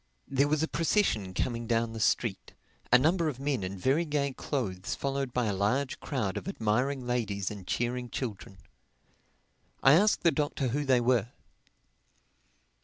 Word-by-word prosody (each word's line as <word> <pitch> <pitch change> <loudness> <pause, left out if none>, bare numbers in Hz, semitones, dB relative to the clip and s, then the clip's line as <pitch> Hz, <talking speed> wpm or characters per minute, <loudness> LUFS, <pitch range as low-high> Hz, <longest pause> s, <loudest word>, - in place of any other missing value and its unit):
There 140 +1 +2
was 155 +1 +1
a - - +1
procession 155 - 0
coming 120 -2 -2
down 115 0 0
the 115 - -6
street, - - 0 0.4
a 125 - +9
number 165 +5 +2
of 130 -4 -6
men 135 -4 -1
in 95 +1 -4
very 135 - +2
gay 145 -3 -1
clothes 100 -11 -3
followed 135 -1 -2
by 125 -1 0
a 105 - 0
large 115 +8 0
crowd 110 -10 -2
of - - -6
admiring 125 - 0
ladies 105 -6 -1
and 100 -3 -9
cheering 120 +1 -2
children. 105 -6 -5 1.3
I 135 - +8
asked 205 +7 +4
the 170 - +5
Doctor 145 -4 -1
who 145 +4 -1
they 130 -3 +4
were. 120 -2 +2
125 Hz, 160 wpm, -29 LUFS, 110-140 Hz, 1.3 s, a